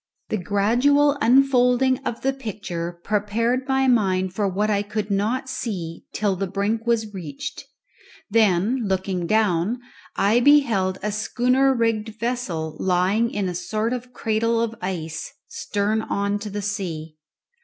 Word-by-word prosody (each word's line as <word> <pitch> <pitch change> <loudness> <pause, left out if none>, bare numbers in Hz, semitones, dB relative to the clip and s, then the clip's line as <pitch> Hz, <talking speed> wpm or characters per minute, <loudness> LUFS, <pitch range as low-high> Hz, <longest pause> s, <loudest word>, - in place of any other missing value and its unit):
The 215 - 0
gradual 245 +10 +3
unfolding 255 0 +4
of 230 - -4
the 270 +1 +1
picture 195 -9 -5
prepared 230 +5 0
my 265 0 +2
mind 190 -6 +2
for 205 +1 0
what 200 +3 0
I 205 -2 +1
could 205 0 -4
not 220 +7 0
see 185 -10 -5
till 205 -2 0
the 195 +1 -2
brink 205 +4 -1
was 220 -3 0
reached; 155 -7 -6 0.6
then, 210 +1 +3
looking 190 -2 -1
down, 215 +1 +1 0.4
I 215 +4 +3
beheld 235 -9 +4
a 210 - 0
schooner 250 +5 +2
rigged 225 -2 -1
vessel 195 -10 -2
lying 190 +5 +2
in 205 -4 -2
a 180 - -3
sort 215 +7 -2
of 250 0 -6
cradle 230 0 0
of 230 -1 -1
ice, 165 -4 -4 0.2
stern 210 +2 -1
on 200 -1 -1
to 210 +1 -6
the 205 0 -4
sea. 165 -6 -4
210 Hz, 145 wpm, -23 LUFS, 190-235 Hz, 0.6 s, unfolding